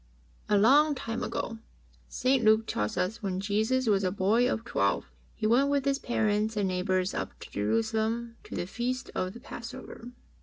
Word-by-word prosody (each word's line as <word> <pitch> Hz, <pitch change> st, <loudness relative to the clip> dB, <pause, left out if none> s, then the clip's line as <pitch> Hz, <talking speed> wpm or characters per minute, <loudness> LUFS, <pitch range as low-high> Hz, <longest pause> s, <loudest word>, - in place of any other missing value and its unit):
A 210 Hz, -, +4 dB
long 285 Hz, +8 st, +5 dB
time 230 Hz, -2 st, -4 dB
ago, 225 Hz, -1 st, -3 dB, 0.5 s
St. 255 Hz, -1 st, +1 dB
Luke 220 Hz, +1 st, +5 dB
tells 105 Hz, -, -2 dB
US 190 Hz, +6 st, -1 dB
when 190 Hz, -3 st, -2 dB
Jesus 220 Hz, +6 st, +1 dB
was 200 Hz, -3 st, +2 dB
a 185 Hz, -, +2 dB
boy 210 Hz, +6 st, +2 dB
of 225 Hz, -, -3 dB
twelve, -, -, 0 dB, 0.3 s
He 220 Hz, -, -3 dB
went 250 Hz, +6 st, +4 dB
with 280 Hz, -1 st, +1 dB
His 275 Hz, 0 st, +1 dB
parents 215 Hz, -2 st, 0 dB
and 200 Hz, -2 st, +1 dB
neighbours 185 Hz, +1 st, 0 dB
up -, -, -4 dB
to -, -, -10 dB
Jerusalem 220 Hz, -, -1 dB
to -, -, -7 dB
the -, -, -2 dB
Feast 245 Hz, +6 st, -3 dB
of 185 Hz, 0 st, -2 dB
the 235 Hz, -, -10 dB
Passover. 240 Hz, 0 st, -9 dB
220 Hz, 180 wpm, -29 LUFS, 195-245 Hz, 0.5 s, long